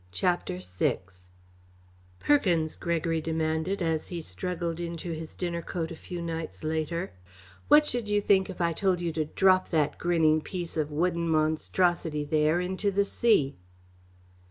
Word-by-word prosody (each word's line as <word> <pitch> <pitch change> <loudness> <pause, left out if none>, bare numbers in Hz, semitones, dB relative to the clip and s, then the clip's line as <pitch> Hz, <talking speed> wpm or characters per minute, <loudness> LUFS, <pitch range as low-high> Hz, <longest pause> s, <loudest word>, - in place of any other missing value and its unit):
CHAPTER 175 - 0
VI 90 0 -1 1.2
"Perkins," 175 - +2
Gregory 165 -1 -1
demanded, 160 +4 -1
as 160 -2 0
he 175 - -5
struggled 170 0 -3
into 170 0 -4
his 160 0 -6
dinner 170 -2 -3
coat 165 0 -4
a - - -6
few 175 +1 -7
nights 165 -1 -5
later, 160 +3 -2 0.6
"what 300 0 +7
should 240 -6 -2
you 205 0 +3
think 195 -2 +3
if 190 - -7
I 170 -1 +2
told 185 +1 +1
you 170 -2 -2
to 155 -1 -1
drop 185 +4 +3
that 155 -3 0
grinning 160 -3 +3
piece 175 0 -5
of 155 -2 -1
wooden 170 +2 0
monstrosity 160 0 +1
there 155 +2 +2
into 185 +3 -1
the 200 +1 +1
sea?" 200 - +2
170 Hz, 150 wpm, -28 LUFS, 155-180 Hz, 1.2 s, what